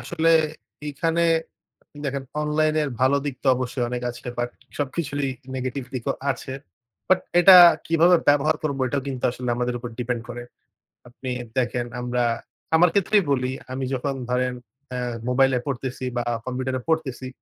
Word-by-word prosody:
আসলে 165 +1 +1 0.6
এখানে 165 +4 0 0.8
দেখেন 140 -1 -2 0.2
অনলাইনের 155 0 +1
ভালো 130 +2 +4
দিক 140 -3 -2
তো - - -6
অবশ্যই 125 -1 -2
অনেক 125 0 -4
আছে 120 - -12
বাট 120 0 0 0.3
সবকিছুরই 145 -1 -2 0.2
নেগেটিভ 130 0 -3
দিকও 125 -3 -1 0.2
আছে। 130 0 -4 0.6
বাট 185 0 +4 0.2
এটা 185 +1 +10 0.3
কিভাবে 170 +2 +5
ব্যবহার 145 +2 +4
করবো 140 -3 -2
এটাও 140 +2 -1
কিন্তু 130 -2 -4
আসলে 125 0 -6
আমাদের 125 0 -1
উপর 120 - -6
ডিপেন্ড 120 -1 -2
করে। 120 0 -6 0.7
আপনি 125 +1 -7 0.3
দেখেন 120 -1 0 0.2
আমরা 125 0 0 0.5
আমার 175 +2 +6
ক্ষেত্রেই 200 0 +3
বলি। 130 -1 +1 0.2
আমি 130 0 -3
যখন 135 +2 -1 0.2
ধরেন 125 0 +1 0.4
আ - - -2 0.3
মোবাইলে 135 0 +3
পড়তেছি 130 -1 -3
বা 120 - +1 0.2
কম্পিউটারে 130 0 -2
পড়তেছি, 135 -5 -1
130 Hz, 145 wpm, -24 LUFS, 125-150 Hz, 0.8 s, এটা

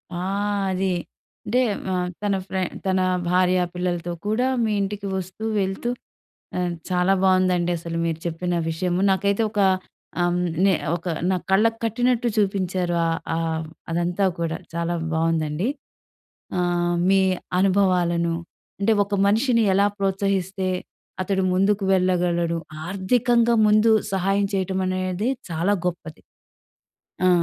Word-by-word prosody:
ఆ! - - -3 0.5
అది. 185 0 0 0.5
అంటే 250 +4 +2 0.3
మ - - -2 0.3
తన 200 -1 +1
ఫ్రె 190 -1 -2 0.2
తన 190 0 +2 0.3
భార్య, 185 0 +3 0.2
పిల్లలతో 175 -1 -2
కూడా 220 +5 +1 0.2
మీ 220 - +1
ఇంటికి 200 0 -3
వస్తూ, 190 +4 -7 0.2
వెళ్తూ 195 +5 -2 1.0
చాలా 180 +1 +3
బాగుందండి. 185 -2 +3
అసలు 165 0 -5
మీరు 165 -1 -2
చెప్పిన 175 +1 -2 0.2
విషయము. 180 +2 -1
నాకైతే 200 +3 +1
ఒక 210 - -2 0.6
అ‌మ్ 175 0 +1 0.3
నె 195 - +5 0.2
ఒక 170 - -8 0.3
నా - - +2
కళ్ళకు 225 +4 +3
కట్టినట్టు 245 +2 +1
చూపించారు 185 -3 0
ఆహ్, 165 - 0 0.2
ఆహ్, 160 -1 -1 0.2
అదంతా 175 +3 0
కూడా 165 -1 -1 0.2
చాలా 170 +1 -1 0.2
బాగుందండి. 160 +3 0 0.9
ఆహ్, 175 0 +1
మీ 195 0 +5 0.4
అనుభవాలను, 180 -3 +2 0.5
అంటే 220 +3 +3
ఒక 200 0 -4
మనిషిని 230 +3 +3
ఎలా 200 +2 +4
ప్రోత్సహిస్తే 195 -1 -1 0.5
అతడు 190 0 0
ముందుకు 195 +2 +2
వెళ్ళగలడు. 175 -2 +1 0.3
ఆర్థికంగా 235 +5 +2
ముందు 215 +2 +5 0.2
సహాయం 195 +1 +1
చేయటం 190 -1 -1
అనేది 185 +3 -1 0.2
చాలా 170 +5 +1
గొప్పది. 165 -3 -5 1.1
ఆ! - - +6
185 Hz, 120 wpm, -23 LUFS, 175-200 Hz, 1.1 s, ఆ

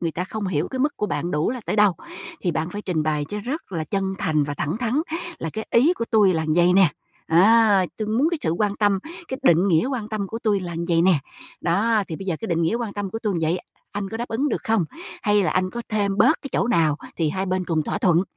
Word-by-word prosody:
người 165 -1 -1
ta 180 +4 -3
không 210 +1 -4
hiểu 165 -3 -1
cái 260 - -5
mức 290 +3 0
của 210 - -1
bạn 165 +2 -2
đủ 150 +6 0
là 250 0 -4
tới - - -1
đâu. 210 -2 +5 0.5
Thì 175 - 0
bạn 160 +2 -2
phải 205 +2 -6
trình 170 -5 -1
bày 150 -1 0
cho 210 - -4
rất 250 - -5
là 160 -2 -2
chân 195 +2 -2
thành 155 -5 +1
và 145 0 -4
thẳng 150 +5 -2
thắn 245 +4 0 0.4
là 165 - -4
"Cái 220 - -5
ý 270 +9 +5
của 235 -10 -3
tui 210 -5 +4
là 160 -1 0
vậy 175 +1 +4
nè, 190 -3 +6 0.4
á. 200 +2 +5
Tui 215 -1 -3
muốn 245 +8 +2
cái 340 - -1
sự 160 - 0
quan 205 +4 0
tâm, 205 -2 +2 0.3
cái 260 - -4
định 180 -5 +4
nghĩa 165 +7 +3
quan 245 -6 -3
tâm 215 -2 -3
của 225 +4 -5
tui 210 -4 +1
là 175 -2 -5
vậy 170 -1 +3
nè. 180 -5 +4 0.4
Đó, 210 +5 +2
thì 160 - -4
bây 195 - -8
giờ 175 -4 -1
cái 225 - -4
định 170 -1 +1
nghĩa 165 +7 +1
quan 230 -3 -3
tâm 205 -2 -4
của 225 - -4
tui 210 -4 -1
vậy, 165 +3 +1 0.3
anh 205 -1 -3
có 225 - -5
đáp 240 +1 -4
ứng 245 +6 0
được - - -2
không? 220 -6 +2 0.4
Hay 205 -1 +3
là 180 - +1
anh 185 0 0
có 235 +3 -5
thêm 200 -2 0
bớt 255 +10 +4
cái 275 - -5
chỗ - - +1
nào 160 -10 +3 0.2
thì 160 -3 +1
hai 190 +4 -2
bên 185 0 -1
cùng 165 -3 0
thỏa - - -2
thuận." 175 -2 +3
195 Hz, 270 wpm, -23 LUFS, 170-220 Hz, 0.5 s, nè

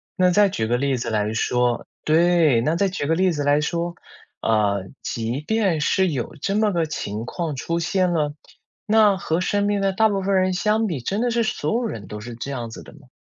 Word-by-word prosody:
那 185 -2 +4
再 200 +3 +4
举 110 - -2
个 120 +2 +1
例 135 0 0
子 120 - -3
来 105 -1 0
说 120 +1 0 0.2
对， 160 -5 +4
那 155 +7 +1
再 195 +3 +2
举 180 -6 -3
个 160 - +2
例 185 +1 +2
子 150 -3 -2
来 145 +1 +3
说， 170 +3 -2 0.5
呃， 100 -3 +1 0.2
即 115 +4 -3
便 195 -3 0
是 190 +4 +2
有 140 0 -4
这 195 - -1
么 215 0 +2
个 170 -3 0
情 110 -8 -4
况 160 +2 -4
出 170 +6 -2
现 180 +2 +1
了。 150 -3 0 0.5
那 215 -2 +5
和 170 -2 -1
身 205 +2 0
边 205 -1 +1
的 195 0 +2
大 220 +3 +3
部 200 -2 -1
分 195 +1 0
人 185 0 +2
相 215 +4 +1
比， 165 -10 -3
真 195 - -2
的 245 +1 +1
是 235 0 +1
所 220 - -1
有 240 +1 0
人 115 - -5
都 105 - -7
是 120 +3 -8
这 120 +4 -6
样 120 -4 -4
子 - - -9
的 - - -14
吗？ 145 -3 -18
165 Hz, 245 characters per minute, -22 LUFS, 125-195 Hz, 0.5 s, 那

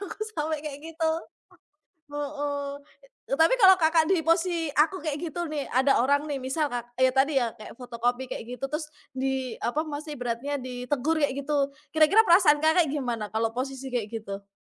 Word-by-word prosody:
Aku 400 - -7 0.2
sampai 310 0 -1
kayak 290 -1 -6
gitu. 320 0 +1 1.0
Heeh. 285 -1 -3 0.6
E - - +3
tapi 330 +10 +5
kalau 380 -5 +7
Kakak 320 0 +3
di 370 - +4
posi 335 -1 +2
aku 330 +5 +3
kayak 300 -3 -3
gitu 345 +1 -3
nih, 300 -2 -3
ada 260 0 +3
orang 285 +3 +2
nih 285 -2 -2
misal 280 +4 0
kak 240 -2 -5
ya 260 0 +5
tadi 270 +1 +3
ya, 235 -2 -1
kayak 215 +1 -11
fotokopi 245 +1 -2
kayak 250 - -5
gitu. 270 - -3
Terus, 300 +2 -4 0.3
di 265 -1 -2
apa 290 +6 0
masih 295 -1 -6
ibaratnya, 245 +4 -2
ditegur 255 +5 -2
kayak 285 -2 +2
gitu. 280 -1 0 0.2
Kira-kira 350 +9 +6
perasaan 340 -4 +6
Kakak 315 0 +3
gimana 240 -7 -3
kalau 225 +1 -1
posisi 270 +1 -4
kayak 230 -4 -1
gitu? 200 -1 -8
285 Hz, 175 wpm, -27 LUFS, 255-315 Hz, 1.0 s, kalau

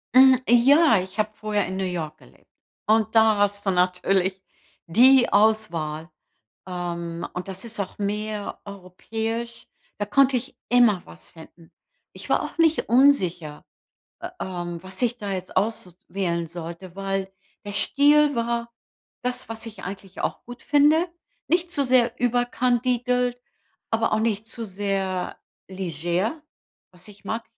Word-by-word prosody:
Hm, 260 -1 +8
ja, 270 +3 +6
ich 185 +3 -9
habe 215 0 +2
vorher 210 -2 -1
in 190 +1 -4
New 190 - -1
York 170 -4 -4
gelebt. - - -22 0.4
Und 220 0 +2
da 220 -1 +5
hast 205 0 0
du 195 - +2
natürlich 185 +1 +1 0.5
die 250 +8 +6
Auswahl. 170 -7 +1 0.6
Ähm. 170 -2 -4
Und 180 +2 -6
das 190 +2 -7
ist 225 -3 -5
auch 190 - -4
mehr 210 0 -3
europäisch, 220 +5 -5 0.3
da 205 - -1
konnte 265 +5 +3
ich 250 +3 -5
immer 235 -6 +4
was 85 0 -13
finden. 165 0 -16 0.4
Ich - - -11
war - - +2
auch - - -8
nicht 325 -1 +2
unsicher, 185 - +2 0.6
äh, 350 - -5
ähm, 175 -2 -5
was 190 0 -7
ich 240 0 +1
da 205 -3 -4
jetzt 185 -1 -6
aussu 205 -4 0 0.2
wählen 170 -4 -2
sollte, 170 +2 -8
weil 195 -1 -3 0.3
der 205 - -6
Stil 290 +6 +4
war 235 0 -2 0.5
das, 250 +1 -3
was 225 0 -6
ich 215 -4 -9
eigentlich 195 0 -8
auch - - -3
gut 245 0 -11
finde. 300 +4 +4 0.4
Nicht 345 +1 +1
zu 285 -5 0
sehr 245 -2 +3
überkandidelt, 245 0 +1 0.5
aber 225 0 +1
auch 215 - +2
nicht 220 -1 -1
zu 230 -1 -6
sehr 195 -2 -2 0.3
leger, 185 - -2 0.5
was 180 +2 -14
ich 205 -1 -16
mag. 225 +3 -3
210 Hz, 145 wpm, -24 LUFS, 185-245 Hz, 0.6 s, Hm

